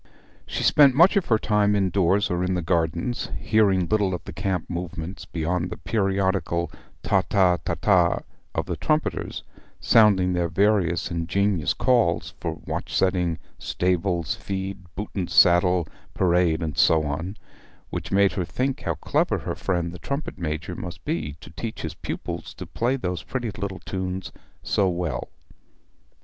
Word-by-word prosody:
She - - -3
spent 140 -4 +6
much 170 +6 +6
of 200 -4 +1
her 110 - +4
time 105 -1 +2
indoors 95 0 +2
or 90 0 0
in 90 0 0
the 90 - -2
garden, 85 +6 0 0.2
hearing 100 -5 +3
little 100 -3 +1
of - - -8
the - - -8
camp 95 +2 -2
movements 85 0 -5
beyond 85 +2 -2
the - - -6
periodical 95 -5 0 0.3
Ta - - +3
ta 95 -4 +4
ta - - -1
taa 90 -4 +3 0.3
of - - 0
the - - -3
trumpeters 155 +1 -1 0.4
sounding 100 -5 +5
their 90 -1 +1
various 95 -1 +2
ingenious 85 +1 0
calls 120 -10 +2
for - - -2
watch - - -4
setting, 90 -3 +1 0.2
stables, 90 -2 0
feed, 95 0 -4 0.2
boot 105 +4 -5
and 95 -3 -2
saddle, 90 -1 +5 0.3
parade, 90 -2 +2
and 80 -3 -3
so 80 -1 +5
on, 80 +7 -4 0.5
which - - -5
made 100 0 +4
her 95 - -2
think 130 +9 -2
how - - -1
clever - - 0
her - - -4
friend 85 -2 -1
the 90 - -9
trumpet 140 +2 -4
major 85 +2 -3
must 90 0 -8
be 150 - -2
to - - -12
teach 110 +7 -6
his 80 -1 -3
pupils - - -6
to - - -7
play 120 +3 0
those 90 - -3
pretty 120 +1 -3
little 95 -1 -5
tunes 95 +1 -4 0.3
so 100 -2 +2
well. 85 -8 -3
90 Hz, 160 wpm, -24 LUFS, 85-100 Hz, 0.5 s, spent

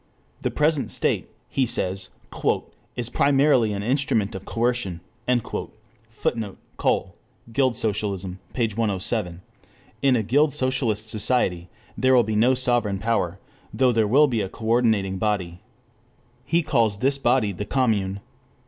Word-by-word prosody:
The - - 0
present 150 -6 +1
state, - - 0 0.2
he 130 -2 0
says, 95 -3 -2 0.9
"is 120 -1 -1
primarily 135 -5 +3
an 100 0 -3
instrument 120 -4 +1
of 95 0 -7
coercion;" 115 -7 -1 1.1
[Footnote: 110 -2 -3 0.2
Cole, - - 0 0.4
Guild 130 -1 +2
Socialism, 100 -4 -2
p. 120 -3 +1
107.] 100 -4 -2 0.6
in 135 -2 +4
a 110 - +1
guild 145 +7 +2
socialist 120 -5 0
society 105 -6 +1 0.3
there 130 0 +3
will 120 - +6
be 110 0 -2
no 120 +5 +4
sovereign 120 -6 +1
power, 95 -4 -1 0.3
though 130 -1 +3
there 110 -2 +2
will 140 +8 +6
be 120 -6 0
a 95 - -3
coordinating 110 -4 +1
body. 95 -5 -1 0.9
He 170 +4 +2
calls 110 -7 +2
this 135 +4 +1
body 120 -5 +2
the 100 +2 -5
Commune. 100 -7 0
110 Hz, 130 wpm, -24 LUFS, 100-130 Hz, 1.1 s, will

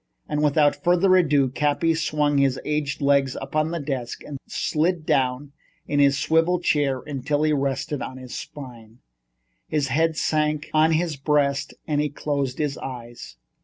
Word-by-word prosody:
And 150 - -1
without 145 0 +3
further 180 +1 +4
ado, 145 -7 +3
Cappy 150 +5 +1
swung 150 -3 +1
his 135 -2 +2
aged 150 -2 -2
legs 140 -2 +2
up 135 +2 -7
on 155 0 +2
to 170 - -3
his 145 - -6
desk 130 -5 -4
and 140 -2 -7
slid 165 +1 -1
down 135 +1 0 0.4
in 145 - 0
his 140 -1 +4
swivel 165 +4 +2
chair 145 -6 +1
until 145 +1 -2
he 155 0 +2
rested 140 0 -1
on 130 - -6
his 130 -1 -9
spine. 120 -6 -9 0.7
His 145 -3 -1
head 160 +3 +1
sank 155 -1 0
on 155 +1 +4
his 160 -2 0
breast 140 -1 0
and 150 -2 0
he 150 - -1
closed 140 -2 -2
his 145 -2 -2
eyes. 120 - -8
145 Hz, 165 wpm, -24 LUFS, 135-155 Hz, 0.7 s, further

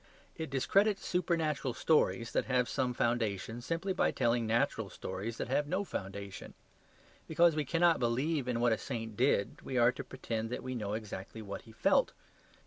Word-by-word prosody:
It 160 -2 -5
discredits 195 +10 +2
supernatural 160 -7 0
stories 125 -7 +2
that - - +1
have 125 -2 +2
some 130 -1 0
foundation, 115 -1 -1
simply 165 +8 -2
by - - +2
telling 120 -2 +1
natural 115 +2 +1
stories 100 +5 -5
that - - -3
have 145 +3 +1
no 185 +6 0
foundation. 100 - -6 0.7
Because 165 0 +4
we 150 -1 0
cannot 170 +3 +3
believe 130 +4 0
in 120 -2 0
what 120 -1 +4
a 110 - -2
saint 115 -2 -5
did, 120 -4 +1
we 130 - -3
are 120 0 +6
to - - -7
pretend 115 -4 -4
that 125 - -4
we 130 - -4
know 105 -4 -3
exactly 110 0 -6
what 100 -1 -6
he - - -11
felt. 110 - +2
125 Hz, 175 wpm, -32 LUFS, 110-155 Hz, 0.7 s, are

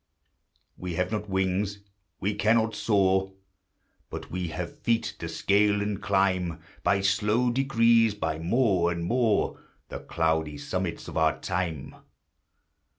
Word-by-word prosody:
We 90 -2 -4
have 90 +3 -1
not 105 -1 -3
wings, 95 +2 0 0.4
we 100 +5 -1
cannot 110 +2 +2
soar; 95 -2 +2 0.8
But - - -7
we 90 0 -2
have 85 +1 -6
feet 115 -1 +1 0.2
to 85 - -5
scale 100 +4 +2
and 100 -1 -2
climb 95 -4 +1 0.2
By 100 -1 +2
slow 105 +5 +2
degrees, 115 -4 +3
by 80 -6 -2
more 90 -1 +2
and 85 -1 -3
more, 115 +1 +1 0.3
The - - -6
cloudy 80 -2 -1
summits 85 +4 -4
of - - -6
our 80 -2 +2
time. 85 -6 -3
95 Hz, 130 wpm, -27 LUFS, 85-105 Hz, 0.8 s, degrees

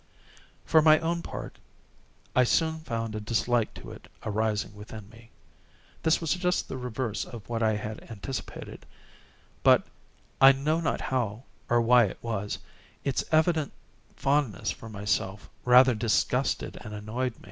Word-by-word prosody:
For 160 - +5
my 155 0 +7
own 170 +1 -1
part, - - -7 0.8
I 125 - +6
soon 160 +5 +1
found 115 -7 -4
a 110 - -3
dislike 115 +2 +1
to - - -9
it - - -12 0.2
arising 105 -1 -1
within 105 0 -10
me. 115 0 -16 0.7
This 160 +1 +3
was 165 -3 0
just 180 0 0
the - - -5
reverse 125 -3 -3
of 115 -4 -10
what 115 -1 -2
I 110 -1 +3
had 105 +1 -6
anticipated; 115 +3 -7 0.7
but—I 135 0 +3
know 150 +4 0
not 160 - -1
how 120 -3 -2 0.3
or 120 0 +4
why 120 0 +6
it 95 - -5
was—its 115 +4 -4
evident 155 -1 +2 0.4
fondness 135 -8 0
for 115 - -9
myself 105 -1 -2
rather 125 +1 +7
disgusted 110 0 0
and 105 0 -7
annoyed. 110 +4 -3
120 Hz, 135 wpm, -28 LUFS, 110-140 Hz, 0.8 s, my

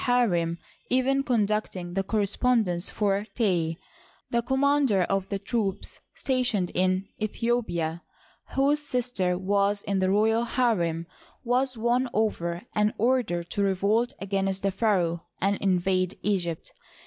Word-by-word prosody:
harem 180 -10 +2 0.2
" - - -35
even 270 +1 +2
conducting 210 -8 -1
the 195 - +1
correspondence 205 -2 +1
for 200 -1 0
Tey, 175 -8 +1 0.5
The 235 - +2
commander 265 -5 +2
of 195 +1 -1
the 200 - -1
troops 200 -1 -2 0.2
stationed 245 -9 0
in 185 +1 +1
Aethiopia, 210 -8 -1 0.5
whose 285 +2 +3
sister 245 -10 -1
was 200 +2 +1
in 200 -1 -1
the 185 0 +2
royal 220 +4 +3
harem, 180 -10 0 0.4
was 255 +1 +1
won 240 +3 +1
over 175 -5 -1
and 210 0 +1
ordered 225 -8 0
to 205 - -1
revolt 200 +5 +1
against 195 -1 -1
the 195 - +2
pharaoh 180 -6 0
and 200 +2 +1
invade 185 -1 +1
Egypt. 175 -6 -2
200 Hz, 125 wpm, -27 LUFS, 185-240 Hz, 0.5 s, whose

